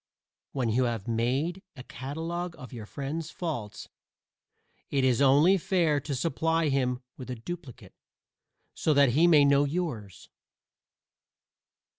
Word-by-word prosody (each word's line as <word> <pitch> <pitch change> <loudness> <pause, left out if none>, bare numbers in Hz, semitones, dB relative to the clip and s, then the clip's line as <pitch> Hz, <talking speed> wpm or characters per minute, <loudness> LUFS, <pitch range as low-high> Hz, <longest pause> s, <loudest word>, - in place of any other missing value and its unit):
When 125 -4 -1
you 125 +3 +2
have 115 -4 -3
made 130 +11 -1
a 130 - -9
catalogue 165 +7 -5
of 130 +1 -11
your 110 -3 -8
friend's 150 +5 -5
faults 140 - -5 1.0
it 135 -2 0
is 130 0 +2
only 145 +8 +5
fair 165 -5 +1
to 140 0 -4
supply 165 +2 0
him 125 -2 0
with 130 - -9
a 125 - -3
duplicate, 135 +2 -9 0.8
so 155 - +1
that 140 -2 +5
he 155 +8 +4
may 150 -4 +6
know 140 0 +4
yours. 140 - -4
140 Hz, 130 wpm, -28 LUFS, 125-165 Hz, 1.0 s, may